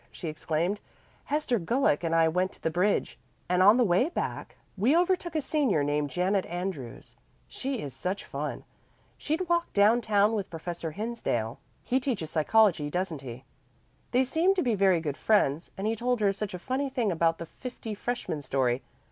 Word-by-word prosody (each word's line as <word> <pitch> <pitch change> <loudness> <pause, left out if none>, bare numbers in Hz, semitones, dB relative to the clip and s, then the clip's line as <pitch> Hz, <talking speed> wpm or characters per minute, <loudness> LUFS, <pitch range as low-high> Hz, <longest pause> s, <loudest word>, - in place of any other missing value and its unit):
she 170 - -7
exclaimed. 165 +5 -1 0.5
"Hester 285 -5 0
Gulick 185 - +1
and 165 0 +1
I 165 0 +5
went 180 +3 0
to - - -18
the 160 - +1
bridge, 185 +5 0 0.3
and 180 +1 +2
on 205 +5 +7
the 250 - +4
way 200 - +3
back 350 - -4 0.2
we 240 - +3
overtook 355 -2 +1
a 310 - +2
senior 265 - +1
named 145 0 0
Janet 185 +6 +1
Andrews. 175 - -6 0.3
She 265 -3 -4
is 140 -3 -6
such 185 +9 -3
fun. - - -4 0.5
She'd 325 +5 -2
walked 340 0 0
down 215 +4 +5
town 210 -1 +3
with 205 -3 -2
Professor 170 0 -5
Hinsdale. 200 - -2 0.2
He 260 - +1
teaches 230 - -3
psychology, 165 -2 +3
doesn't 175 -3 -2
he? 125 -1 -8 0.7
They 255 +1 +3
seem 330 +9 +2
to 365 - +1
be 245 -4 +1
very 190 -4 +3
good 145 -3 -3
friends, 170 -7 +2
and 195 - -3
he 220 +1 +1
told 245 +2 0
her 200 -2 +3
such 200 -1 -4
a - - -4
funny 260 +9 -2
thing 240 -6 0
about 165 -1 +2
the 170 - -6
fifty 235 +3 -7
freshmen 210 -8 -3
story. 130 -2 0
195 Hz, 180 wpm, -28 LUFS, 165-245 Hz, 0.7 s, on